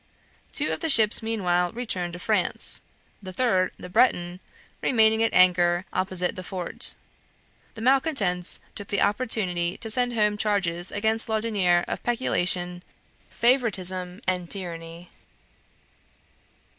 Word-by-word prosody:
Two - - 0
of - - -4
the 325 - -2
ships 220 -6 +3
meanwhile 180 -6 0
returned 185 -8 -3
to - - -6
France, 175 - 0 0.4
the 190 -2 -8
third, 185 -4 +1
the - - -9
"Breton," 180 -3 +1 0.4
remaining 220 -2 +3
at 225 - +2
anchor 175 0 +4
opposite 185 -1 -1
the 185 - -6
fort. 180 -1 -2 0.8
The 220 - -8
malcontents 240 - +1
took 205 - -7
the 200 - +1
opportunity 195 -6 0
to 225 - -6
send 245 +2 +2
home 210 -2 +1
charges 190 -5 -1
against 220 +3 +1
Laudonniere 205 -6 +1
of - - -4
peculation, 180 -7 0 0.5
favoritism, 190 -7 0
and 180 -2 -2
tyranny. 170 -2 -6
190 Hz, 120 wpm, -25 LUFS, 180-225 Hz, 0.8 s, anchor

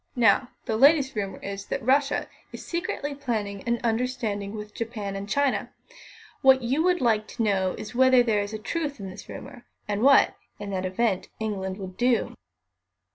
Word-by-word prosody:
Now, 240 +1 +4 0.2
the 220 - -1
latest 280 +1 +5
rumour 195 -3 -3
is 200 0 -6
that - - -3
Russia 275 +2 +2 0.2
is - - -9
secretly 340 -4 -3
planning 220 -8 -3
an 235 0 +1
understanding 225 -4 -1
with 210 -1 -7
Japan 215 -4 -4
and 200 +1 -6
China. 280 +2 +1 0.7
What 265 -1 +6
you 265 +6 +1
would 360 +1 +2
like 220 -3 +2
to 230 - -3
know 190 -3 +1
is 215 - -7
whether 260 0 +5
there 215 -4 +1
is 205 +2 -4
truth 295 -1 -3
in 195 -1 -6
the 190 - -10
rumour, 240 - -10 0.2
and 205 0 -1
what, 275 +2 +6 0.2
in 205 -1 -6
that 185 -1 -1
event, 190 0 0
England 195 -3 -3
would 185 -2 -8
do." 245 -1 +2
225 Hz, 175 wpm, -26 LUFS, 200-260 Hz, 0.7 s, What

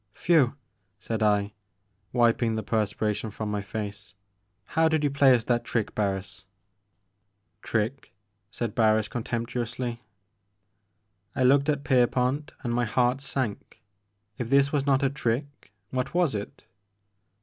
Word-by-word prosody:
"Whewl" 145 -7 +3 0.4
said 110 +1 -4
I, 105 -1 +2 0.6
wiping 120 -2 +2
the 110 - -2
perspiration 105 0 -1
from 105 0 -4
my 105 -1 -1
face, 105 -1 -6 0.3
" 100 -2 -47
how 160 +1 +4
did 160 -1 +1
you 145 - +2
play 140 -2 +6
us 115 - -1
that 120 0 0
trick, 115 -3 -2
Barris?'' 100 -1 -3 1.2
Trick? 115 +5 -2 0.2
" 100 -1 -49
said 115 0 -4
Barris 110 -1 +3
contemptuously. 120 +1 -3 1.3
I 130 - +1
looked 140 +3 +4
at 145 -2 0
Pierpont, 130 +2 +1
and 120 -2 -1
my 120 0 +1
heart 125 +4 +1
sank. 115 -4 -4 0.6
If 120 -2 -3
this 140 +1 +4
was 145 -2 0
not 135 0 +3
a 135 - +3
trick, 140 -2 -3 0.2
what 130 +4 -2
was 175 -7 +2
it 100 -1 -6
120 Hz, 140 wpm, -27 LUFS, 105-135 Hz, 1.3 s, play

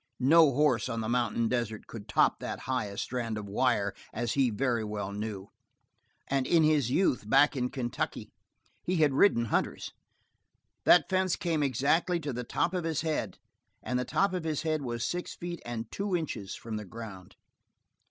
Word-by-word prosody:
No 155 +3 +6
horse 130 -5 +2
on 115 -2 -2
the 110 - -3
mountain 115 -1 +1
desert 115 -3 -2
could 110 -3 -9
top - - +3
that - - -5
highest 110 -7 -2
strand 115 -3 -3
of 105 -1 -6
wire 105 -2 +1 0.2
as 120 0 -2
he 135 -3 +3
very 120 0 0
well 105 -2 -4
knew; 100 -1 -5 0.8
and 135 -1 0
in 165 -2 +4
his 150 -5 +3
youth, 130 - +1
back 145 +5 +5
in 125 -1 -1
Kentucky, 120 -3 -4 0.5
he 180 - -1
had 155 -4 +3
ridden 130 -6 +4
hunters. - - -1 0.9
That 175 -5 +6
fence 185 -1 +1
came 165 -3 -1
exactly 145 +6 +1
to 145 -3 -3
the 125 +1 -4
top 170 - -1
of 180 -2 -1
his 160 -2 -1
head, 160 -2 -2 0.5
and 125 0 -1
the - - 0
top 195 +9 +1
of 180 -3 -2
his 155 -2 -2
head 155 -2 0
was 120 -3 -3
six 175 +6 -3
feet 175 0 -6
and 115 -1 -5
two 200 -2 -1
inches 145 - -4
from 115 -2 -6
the 105 - -6
ground. 100 -3 -10
125 Hz, 180 wpm, -29 LUFS, 115-160 Hz, 0.9 s, No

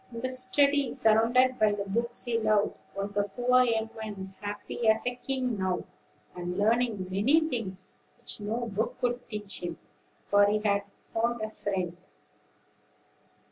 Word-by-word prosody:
In 230 -1 -6
the 255 +1 -1
study, 275 +2 +3
surrounded 240 +4 +3
by 215 -1 +4
the 205 -1 -2
books 235 +4 -1
he 235 -2 +1
loved, 215 -2 +2 0.2
was 200 +1 -3
the 205 0 +2
poor 250 +4 +3
young 225 -2 0
man, 195 -3 -6
happy 205 +3 -4
as 220 +2 +4
a 245 - 0
king 250 -3 -2
now, 185 -1 0 0.5
and 180 0 -4
learning 220 -2 +2
many 230 +12 +4
things 195 -9 -4 0.2
which - - -5
no 225 +4 -2
book 220 0 -2
could 245 0 -2
teach 210 -3 -3
him; 175 -2 -4 0.5
for 205 0 +5
he 210 +1 +2
had 200 0 +3 0.2
found 235 +1 -2
a - - -1
friend. 185 -5 -3
220 Hz, 155 wpm, -29 LUFS, 200-245 Hz, 0.5 s, for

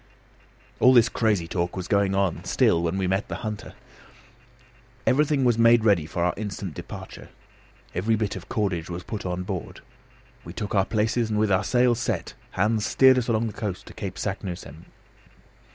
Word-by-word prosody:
All 130 - +6
this 115 -2 +6
crazy 105 -7 0
talk 85 +1 -2
was 90 -1 -4
going 100 -1 +2
on 95 -3 0
still 85 - +2
when 85 +2 -1
we 95 - 0
met 95 +2 0
the - - -5
hunter. 105 -1 -6 1.3
Everything 145 0 +2
was 120 -2 +2
made 115 -1 +5
ready 90 -8 +3
for 85 +1 -2
our 90 - +2
instant 100 -4 -5
departure. - - -9 0.6
Every 105 +6 +1
bit 105 -2 -2
of 95 - -9
cordage 95 -6 -1
was 90 +1 -5
put 105 -4 -5
on 90 0 -3
board. 95 -2 -6 0.6
We - - -9
took 105 -3 -5
our 95 -2 +3
places, 110 +1 0
and 105 - -1
with 105 -1 +2
our 95 +1 +3
sail 125 +1 +3
set, 115 -7 -3 0.2
Hans 110 +3 +1
steered 130 +2 +5
us 120 - -4
along 115 -1 +1
the 110 - -4
coast 100 -4 -5
to - - -12
Cape 95 -3 -6
Saknussemm. 90 -6 -5
100 Hz, 180 wpm, -25 LUFS, 90-115 Hz, 1.3 s, All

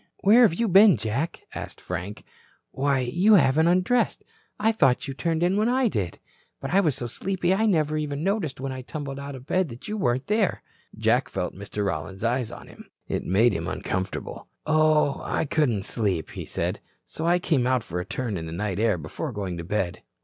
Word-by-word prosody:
"Where 220 +5 +6
have 215 -9 +5
you 230 +5 0
been, 195 - +7
Jack?" 115 +10 -3
asked - - -7
Frank. 90 +3 -6 0.5
"Why, 135 0 +1
you 175 - +4
haven't 155 0 +4
undressed. 185 +8 +2 0.4
I 220 +2 +3
thought 135 - +2
you 135 - -4
turned 165 +3 -1
in 180 +3 +2
when 215 +3 +2
I 255 -1 +2
did. 90 - -3 0.4
But 135 - -5
I 195 - +6
was 155 -9 +2
so 120 - -4
sleepy 180 +8 -1
I 220 +3 +2
never 155 -5 +1
noticed 150 +1 -2
when 135 0 -3
I 130 0 -5
tumbled 140 +1 -6
out 140 0 -6
of 130 -1 -11
bed 185 +1 +1
that 115 +1 -10
you 215 0 -3
weren't 125 -3 0
there." 210 0 0 0.3
Jack - - +2
felt - - -3
Mr. 100 +1 -4
Rollins's 95 +2 -4
eyes 120 0 0
on - - -10
him. - - -14 0.2
It - - -2
made 105 +5 +4
him - - -3
uncomfortable. 95 0 -4 0.2
"Oh, 155 -2 +3
I - - -1
couldn't 125 -10 +1
sleep," 95 -8 -1
he - - -6
said. - - -2 0.3
"So 160 - -4
I 175 +1 +4
came 150 -8 +1
out 130 -3 +1
for 90 -5 -4
a - - -2
turn 110 +2 -3
in 80 -1 -5
the - - -6
night 95 +2 -3
air 110 -4 +2
before 85 - -5
going 100 -5 -4
to - - -5
bed." 90 -1 -2
135 Hz, 205 wpm, -25 LUFS, 105-175 Hz, 0.5 s, been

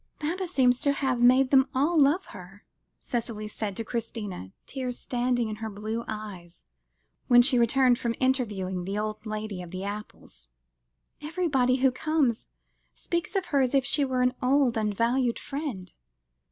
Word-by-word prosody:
"Baba 355 +5 -2
seems 255 -7 +3
to 280 - +2
have 265 -3 -1
made 255 +2 +5
them 265 -1 +5
all 295 +6 +2
love 305 +5 +4
her," 195 +1 -12 0.3
Cicely 225 -3 -4
said 210 -2 -4
to 230 - -2
Christina, 215 - -5
tears 255 -2 -4
standing 245 -1 -1
in 215 0 -5
her 220 0 -5
blue 215 +3 -4
eyes, 200 -6 -8 0.6
when 245 0 +7
she 255 -1 +4
returned 245 +1 +3
from 235 -1 -1
interviewing 205 -9 -1
the 195 +2 -3
old 215 +1 -4
lady 215 -3 -4
of 175 - -9
the 185 +2 -6
apples; 205 +1 -8 0.7
"everybody 295 -6 +1
who 265 - +5
comes, 265 -3 0 0.5
speaks 340 +3 -3
of 385 -1 0
her 280 - +4
as 260 +1 +1
if 270 -1 +3
she 290 +2 +2
were 255 -2 0
an 250 0 +2
old 260 -1 +3
and 210 -2 -1
valued 240 +1 +1
friend." 260 - -5
245 Hz, 165 wpm, -27 LUFS, 215-270 Hz, 0.7 s, when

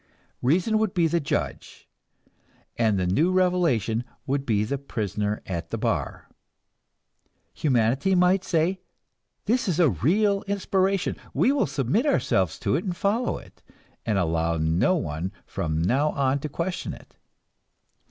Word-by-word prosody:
Reason 180 - +2
would 215 -3 -1
be 170 -2 +3
the 170 +1 +2
judge, 145 - -4 0.9
and 110 -4 +2
the 90 - 0
new 145 - +2
revelation 170 - +1 0.2
would 140 +1 -2
be 105 -3 +2
the 135 +6 -2
prisoner 105 -5 -3
at 85 -3 -4
the - - -3
bar. - - -2 1.3
Humanity 135 - +1
might 180 +1 +3
say, 175 +3 0 0.6
this 240 +2 +1
is 180 -3 0
a 160 -7 +5
real 195 - +2
inspiration, 195 -1 0 0.2
we 265 - +4
will 285 - +1
submit 140 - 0
ourselves 285 - +1
to - - +1
it - - -1
and 180 -4 -3
follow 215 +6 0
it, - - -15 0.4
and 105 -3 0
allow 85 -2 0
no 80 - +2
one 85 - -3
from 80 0 -2
now 130 - +2
on 135 0 +1
to 150 - -5
question 175 +5 -3
it. - - -18
145 Hz, 145 wpm, -25 LUFS, -, 1.3 s, a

